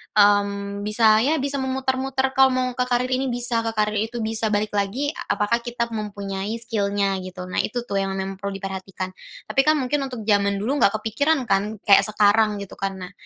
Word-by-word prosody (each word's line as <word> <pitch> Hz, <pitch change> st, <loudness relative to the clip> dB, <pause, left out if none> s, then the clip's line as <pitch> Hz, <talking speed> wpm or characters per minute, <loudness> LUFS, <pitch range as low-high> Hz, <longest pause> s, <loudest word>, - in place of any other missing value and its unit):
mmm, 200 Hz, -1 st, +3 dB
bisa 215 Hz, 0 st, +4 dB
ya 280 Hz, +8 st, +2 dB
bisa 280 Hz, 0 st, -2 dB
memutar-mutar 265 Hz, 0 st, -1 dB
kalau 265 Hz, 0 st, +6 dB
mau 255 Hz, 0 st, +1 dB
ke 250 Hz, -, +1 dB
karir 250 Hz, +1 st, 0 dB
ini 260 Hz, +1 st, +1 dB
bisa 240 Hz, -1 st, -1 dB
ke -, -, 0 dB
karir 210 Hz, 0 st, +1 dB
itu 240 Hz, +1 st, -8 dB
bisa 220 Hz, 0 st, -1 dB
balik 210 Hz, 0 st, 0 dB
lagi 215 Hz, +9 st, 0 dB, 0.2 s
apakah 210 Hz, +3 st, +1 dB
kita 235 Hz, -1 st, -3 dB
mempunyai 200 Hz, -1 st, -4 dB
skill-nya 200 Hz, -4 st, 0 dB
gitu 185 Hz, 0 st, -7 dB
nah -, -, -1 dB
itu 245 Hz, +2 st, -1 dB
tuh 200 Hz, -3 st, -1 dB
yang 195 Hz, 0 st, -2 dB
memang 195 Hz, 0 st, -4 dB
perlu 200 Hz, 0 st, -4 dB
diperhatikan. 190 Hz, -1 st, -5 dB, 0.4 s
Tapi 270 Hz, -, -1 dB
kan 310 Hz, -, +6 dB
mungkin 275 Hz, +1 st, -1 dB
untuk 250 Hz, -4 st, -7 dB
zaman 200 Hz, -1 st, +3 dB
dulu 260 Hz, +8 st, -1 dB
nggak 200 Hz, -, +4 dB
kepikiran 285 Hz, +6 st, +1 dB
kan 205 Hz, +3 st, +1 dB
kayak 200 Hz, -, +6 dB
sekarang 210 Hz, 0 st, +3 dB
gitu 195 Hz, -, -11 dB
kan 195 Hz, 0 st, -2 dB
nah, 180 Hz, 0 st, -7 dB
215 Hz, 195 wpm, -23 LUFS, 200-250 Hz, 0.4 s, kalau